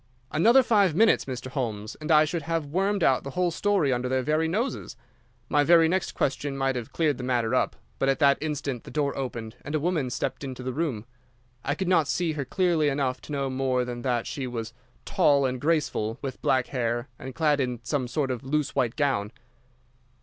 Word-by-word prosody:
_' - - -39 0.3
"Another 230 +12 +5
five 200 -8 +3
minutes, 225 +5 +4
Mr. 130 -2 -5
Holmes, 110 -6 -3
and 155 - -5
I 155 -1 +6
should 165 +2 -3
have 165 0 -2
wormed 195 +5 0
out 130 -4 +3
the 140 - -5
whole 180 -1 +2
story 180 -6 +1
under 125 +1 -2
their 130 0 +1
very 155 +3 +1
noses. 225 +10 -2 0.5
My 145 +3 +3
very 165 +1 +6
next 185 +2 -1
question 140 0 -1
might 135 -1 0
have 120 -3 -5
cleared 150 -5 0
the - - -5
matter 120 -3 0
up, - - +1 0.2
but 135 - +2
at 135 - +2
that 140 -2 +4
instant 145 -5 -3
the - - -11
door 145 -2 -1
opened 120 -3 -5
and 145 +2 -4
a - - +2
woman 155 -4 0
stepped 130 +3 -3
into 130 -2 -6
the 130 0 -3
room. 140 -9 -2 0.6
I 145 - -1
could 190 +3 -3
not 165 -5 +3
see 175 0 0
her 145 -3 -3
clearly 170 -5 +2
enough 135 -2 -1
to - - -11
know 140 -2 -1
more 130 -1 0
than 120 -1 -5
that 120 -2 0
she 135 -3 -4
was 115 -2 -5 0.3
tall 145 -8 +3
and 130 -1 -2
graceful, 145 -8 0
with 135 -2 -6
black 130 -2 +2
hair, 120 0 -1
and 130 0 -8
clad 150 -1 +2
in 125 -3 -1
some 130 0 -1
sort 135 +1 -1
of 125 -2 -4
loose 150 +2 -1
white 125 -4 0
gown. 130 -9 0
140 Hz, 215 wpm, -26 LUFS, 125-160 Hz, 0.6 s, I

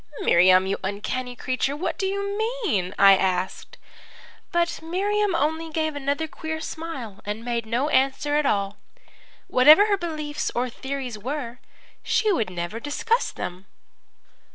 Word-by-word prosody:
"'Miriam, 185 +2 +5
you 195 +1 -1
uncanny 245 +6 -3
creature, 260 +3 -1
what 335 - -2
do 385 - 0
you 400 +1 -2 0.3
mean?' 190 - 0
I 195 0 +8
asked. 185 -1 -2 0.7
"But 340 -1 0
Miriam 395 +4 0
only 320 +1 0
gave 315 -1 -1
another 285 +3 -1
queer 315 0 -5
smile 315 -11 -6
and 210 +3 -5
made 235 -2 -2
no 240 +6 0
answer 275 +2 +1
at 300 -1 +2
all. 200 0 0 0.7
Whatever 305 +10 +7
her 410 -2 +2
beliefs 305 -4 -3
or 245 +1 -1
theories 265 -3 -5
were, 250 0 -5 0.4
she 430 - +1
would 225 - 0
never 175 +4 -4
discuss 450 - 0
them. 180 +2 -7
275 Hz, 140 wpm, -24 LUFS, 210-320 Hz, 0.7 s, I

